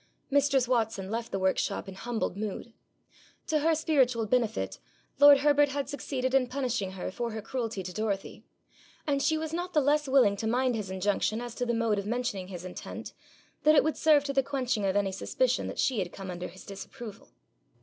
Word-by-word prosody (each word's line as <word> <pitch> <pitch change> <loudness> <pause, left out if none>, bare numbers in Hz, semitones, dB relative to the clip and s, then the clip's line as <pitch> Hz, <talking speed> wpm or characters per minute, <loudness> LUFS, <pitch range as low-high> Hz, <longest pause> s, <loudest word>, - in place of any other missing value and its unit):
Mistress 275 -2 +3
Watson 220 -5 0
left 230 +1 -3
the - - -1
workshop 190 0 0
in 195 - -7
humbled 225 0 -3
mood. 215 +2 -5 0.7
To 310 -2 +1
her 320 +2 +3
spiritual 265 -7 +2
benefit 230 -1 0 0.4
lord 285 -1 +8
Herbert 290 0 +4
had 280 0 -2
succeeded 260 -2 -3
in 265 -2 +4
punishing 245 -7 -2
her 185 -1 -5
for 235 +4 -3
her 220 - -4
cruelty 225 -4 -3
to 180 0 -6
Dorothy; 205 -2 -3 0.6
and 280 -2 +1
she 315 +2 +2
was 315 0 -4
not 355 +2 -3
the - - +6
less 295 +1 +2
willing 260 -7 +4
to 220 - -2
mind 250 +1 +1
his 210 -4 -4
injunction 205 +3 0
as 240 -1 -6
to 245 +1 -3
the 235 - +1
mode 225 -3 +1
of 200 - -5
mentioning 225 -5 -2
his 180 -2 -8
intent, 180 - -7 0.5
that 305 +1 +5
it - - +6
would 315 - 0
serve 305 -3 +4
to 280 -1 -3
the 270 - +4
quenching 255 -6 -1
of 190 0 +1
any 200 -1 +1
suspicion - - 0
that - - -6
she 255 -5 +1
had 180 -2 -2
come 190 -1 -7
under 180 0 -5
his 185 +2 -13
disapproval. 215 +3 -9
240 Hz, 200 wpm, -29 LUFS, 200-280 Hz, 0.7 s, lord